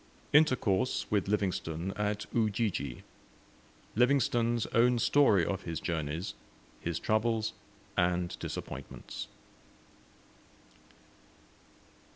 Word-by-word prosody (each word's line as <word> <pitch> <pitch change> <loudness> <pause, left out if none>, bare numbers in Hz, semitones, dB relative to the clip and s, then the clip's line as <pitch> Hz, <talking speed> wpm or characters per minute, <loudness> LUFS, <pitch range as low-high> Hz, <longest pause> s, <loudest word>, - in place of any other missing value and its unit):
INTERCOURSE 130 -7 +3
WITH 100 -3 +1
LIVINGSTONE 95 -3 -1
AT 105 0 -1
UJIJI 105 - 0 0.9
LIVINGSTONE'S 120 -2 +3
OWN 120 +2 +4
STORY 115 - +4
OF 95 -1 -2
HIS 85 -3 -4
JOURNEYS, 80 +1 -3 0.5
HIS 85 -1 -2
TROUBLES, 110 +1 +1 0.4
AND 90 -1 +1
DISAPPOINTMENTS. - - -6
105 Hz, 75 wpm, -31 LUFS, 90-115 Hz, 0.9 s, OWN